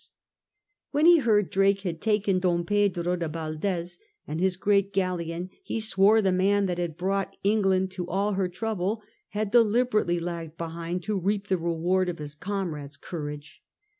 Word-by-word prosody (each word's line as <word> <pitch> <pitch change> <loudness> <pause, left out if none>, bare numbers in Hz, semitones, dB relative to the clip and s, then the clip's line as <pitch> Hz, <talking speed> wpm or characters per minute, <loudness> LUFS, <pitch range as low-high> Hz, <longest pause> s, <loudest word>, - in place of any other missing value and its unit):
When 295 +2 +2
he 345 -1 +8
heard 210 -7 +2
Drake 195 +1 +3
had 170 -4 -4
taken 210 -3 +2
Don 175 -2 +1
Pedro 180 -3 +1
de 170 -2 -3
Yaldes 165 +3 -3 0.3
and 155 - -4
his 185 0 +1
great 200 0 +2
galleon, 180 -2 -2
he 390 - -4
sworje 215 0 +4
the 190 - +3
man 195 +2 +2
that 180 -2 -2
had 170 -3 -3
brought 195 +2 -1
England 195 -2 +2
to 180 -2 -5
all 200 +4 0
her 190 -1 0
trouble 215 +2 -2 0.2
had 210 -1 -3
deliberately 220 -5 +3
lagged 165 -2 -5
behind 170 +2 -4
to 205 +1 -1
reap 200 +2 -1
the 190 - +2
reward 170 +2 0
of 170 - -4
his 150 -1 -6
comrades' 155 -6 -4
courage. 150 -2 -7
185 Hz, 165 wpm, -27 LUFS, 170-205 Hz, 0.3 s, he